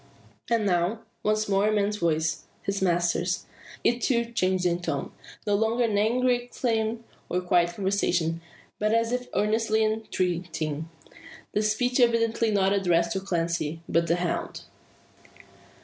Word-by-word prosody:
And 230 -3 +2
now, 180 +4 +1 0.2
once 215 0 +1
more 200 +1 +2
a - - +3
man's 210 0 +1
voice, 160 -3 0 0.2
his 200 0 -2
master's. 175 0 +1 0.4
It 240 +1 +2
too 235 -2 +1
changed 185 -4 +1
in 175 0 +1
tone. 155 -5 -3 0.3
No 205 - +1
longer 225 +4 +2
in 220 -3 +1
angry 245 +4 +3
exclaim, 230 -2 -1 0.3
or 180 - +1
quiet 175 -1 +2
conversation, 175 -4 0 0.4
but 215 +1 +2
as 230 0 +1
if 250 0 -2
earnestly 220 +1 +2
entreating; 175 -7 -2 0.6
the 210 - +1
speech 245 +4 +1
evidently 230 -1 +3
not 195 -2 +2
addressed 170 -4 +2
to 190 - 0
Clancy, 170 -4 -2
but 170 0 +1
the 170 - +3
hound. 175 -1 -3
200 Hz, 140 wpm, -26 LUFS, 175-225 Hz, 0.6 s, a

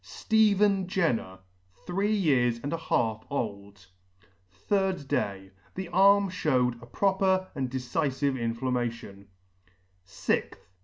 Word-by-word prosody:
STEPHEN 205 -3 +2
JENNER, 125 - -1 0.5
three 195 +4 0
years 130 - +2
and 145 - -3
a - - -1
half 110 -8 -1
old. 100 -7 -5 0.8
3d 190 -7 0
day. 95 -5 -2 0.2
The 190 -2 -5
arm 195 +2 +5
fhewed 125 -9 0
a 120 - -12
proper 190 +4 +1
and 135 -4 -3
decifive 135 +2 -1
inflammation. 115 -4 -3 0.8
6th. - - -2
140 Hz, 105 wpm, -28 LUFS, 120-190 Hz, 0.8 s, arm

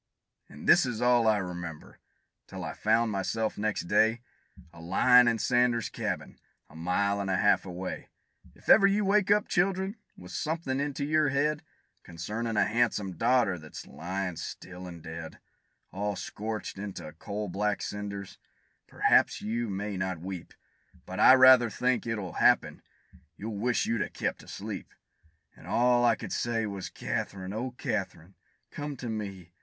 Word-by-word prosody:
An' - - -11
this - - +6
is 115 -3 -3
all 120 -1 +4
I 110 -1 +4
remember, 90 -4 -7 0.5
till - - -7
I - - -4
found 110 +1 +2
myself 110 +3 -1
next 105 0 -1
day, 110 +6 +2 0.5
A 85 - -12
lyin' 125 +8 +5
in 115 -1 +2
Sanders' 120 -1 +2
cabin, - - -4 0.3
a - - -16
mile 100 +5 0
an' 100 - -3
a 95 - +2
half 100 -1 +3
away. 90 +1 -6 0.5
If - - -21
ever 195 -2 +7
you 200 +1 +1
wake 200 0 +3
up, 210 +1 +3
children, 190 +2 0 0.2
with 90 0 -11
somethin' 145 - -2
into 140 0 -2
your 155 0 +2
head, 145 +2 +1 0.4
Concernin' 105 +7 -4
a - - +4
han'some 110 -4 0
daughter, 110 -1 +2
that's 75 -1 -10
lyin' 90 0 -4
still 90 +1 -8
an' 85 -2 -9
dead, 80 0 -8 0.5
All 105 +1 -2
scorched 105 0 -5
into 90 -6 -7
coal 105 +1 -4
black 100 +2 -1
cinders 100 -1 -6 0.5
perhaps - - +3
you 115 +1 -2
may 100 0 -3
not 95 -1 -2
weep, 90 0 -7 0.5
But 95 +2 -6
I 130 - +9
rather 130 -2 +7
think 125 +3 0
it'll 105 -5 -3
happen - - +3 0.6
you'll 105 0 -5
wish 120 +2 +1
you'd 115 -2 0
a - - -2
kept - - -3
asleep. - - -7 0.6
And - - -15
all 120 0 +3
I 120 -2 +4
could 110 -2 -7
say, 115 -1 -1
was 100 -2 -5
"Kath'rine, 95 0 -4
oh 125 +3 -4
Kath'rine, 95 -3 -4 0.4
come 145 -1 -5
to 120 - -6
me!" 100 -6 -6
105 Hz, 160 wpm, -29 LUFS, 95-125 Hz, 0.6 s, I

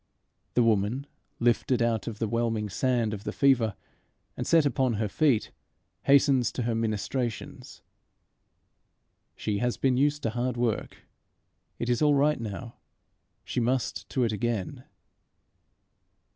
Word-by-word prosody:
This 125 - +5
woman, 115 +4 +1 0.3
lifted 120 +1 +2
out 115 -3 0
of 115 -2 -4
the 110 - -1
whelming 115 -1 -1
sand 120 +1 0
of 100 -1 -6
the - - -3
fever 120 -7 +3 0.6
and - - -4
set 165 -2 +5
upon 130 -2 +1
her 110 0 -1
feet, 130 +1 +1 0.5
hastens 135 -3 +4
to 125 - -2
her 115 0 0
ministrations. 115 +1 -3 1.5
She 105 -1 -2
has 125 +1 0
been 130 -2 +2
used 145 +2 +1
to 115 - 0
hard 120 +1 -2
work. 120 -2 -2 0.7
It 120 - -3
is 120 +2 +1
all 150 -1 +4
right 145 +1 +2
now; 115 +2 -6 0.7
she - - -2
must 125 +1 -1
to 130 - 0
it 115 - +1
again. 110 -2 -3
120 Hz, 135 wpm, -27 LUFS, 110-130 Hz, 1.5 s, This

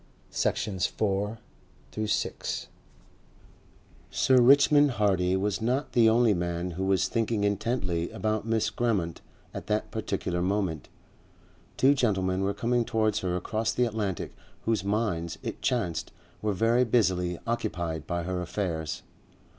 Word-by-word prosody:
Section 95 -3 -1
4 105 +3 0 2.7
Sir 130 -1 +4
Richmond 145 +3 +6
Hardy 95 -4 +2
was 100 -1 -1
not 125 +6 0
the 115 -2 +5
only 115 -1 +4
man 85 0 -2
who 95 +3 -3
was 95 -1 +2
thinking 115 -2 0
intently 100 -4 -1
about 110 -1 -1
Miss 110 -1 +1
Grammont 100 -9 -1 0.3
at - - -7
that - - -1
particular 90 0 -2
moment. 95 -4 -1 0.9
Two 135 +2 +5
gentlemen 95 -8 +1
were 100 +1 0
coming 120 0 +1
towards 110 -2 +1
her 90 -1 -1
across 110 +4 -1
the 125 - +2
Atlantic 105 -6 -3 0.3
whose 110 -4 +1
minds, 100 -5 -1
it - - -5
chanced, 95 -10 -1 0.3
were 105 -1 0
very 115 +6 +3
busily 90 -7 +1
occupied 85 -9 -2
by 85 -1 -2
her 90 +1 -2
affairs. 85 -4 -3
105 Hz, 125 wpm, -28 LUFS, 90-115 Hz, 2.7 s, Richmond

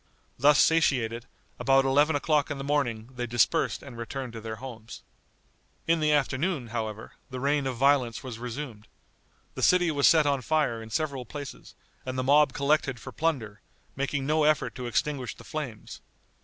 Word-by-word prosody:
Thus 145 +2 +5
satiated, 125 -8 +2 0.3
about 135 0 +4
eleven 145 +3 +3
o'clock 150 0 +1
in 145 - -3
the 135 - -5
morning 125 -6 -1
they 120 0 -3
dispersed 120 +7 +1
and 130 -4 -10
returned 125 +1 -5
to 115 - -7
their 110 0 -5
homes. 115 -2 -10 0.8
In 165 0 +2
the 155 -1 +2
afternoon, 145 -1 0
however, 110 -1 -5 0.2
the 130 - -6
reign 140 +1 +1
of 130 - -3
violence 135 -2 +2
was 125 -4 -7
resumed. 120 -3 -6 0.7
The - - -6
city 180 -2 +4
was 145 -2 +3
set 160 -2 +5
on 140 -2 +1
fire 140 -5 0
in 110 - -10
several 140 +1 -2
places, 145 +3 -9 0.3
and 130 0 -5
the 130 - 0
mob 145 +1 +5
collected 140 -3 +1
for 130 - -9
plunder, 125 -10 -2 0.3
making 140 0 -2
no 155 +2 +2
effort 155 0 +2
to 125 -2 -6
extinguish 130 +2 -2
the - - -14
flames. 145 -9 -7
135 Hz, 170 wpm, -27 LUFS, 120-150 Hz, 0.8 s, Thus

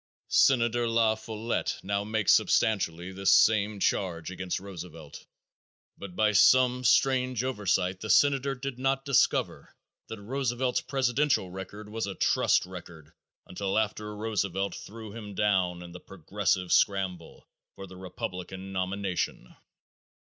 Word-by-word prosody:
_ - - -10
Senator 120 -2 +3
La 115 -1 +3
Follette 110 +1 -3
now 100 +1 -1
makes 110 -1 +2
substantially 90 -4 +1
this 95 0 +1
same 105 -1 +4
charge 90 -3 -1
against 95 -1 -3
Roosevelt, 85 -6 -10 0.7
but 95 -3 -10
by 110 +1 +3
some 125 +4 +4
strange 125 0 +2
oversight 95 -6 -1
the 110 - -6
senator 140 0 +3
did 130 -1 -6
not 135 +1 0
discover 140 -3 +1 0.3
that 110 - -7
Roosevelt's 125 +2 -1
presidential 135 -6 0
record 95 +3 -8
was 110 0 -4
a 100 - -5
trust - - +2
record 85 -4 -11 0.3
until 95 +2 -3
after 105 -1 -2
Roosevelt 100 -3 -2
threw 110 0 -9
him 105 -3 -8
down 95 -4 +1
in 85 - -10
the 90 - -10
"Progressive" 95 0 -2
scramble 95 -4 0 0.3
for 95 - -8
the 95 -1 -13
Republican 95 0 -7
nomination. 95 -7 -3
100 Hz, 130 wpm, -28 LUFS, 95-115 Hz, 0.7 s, same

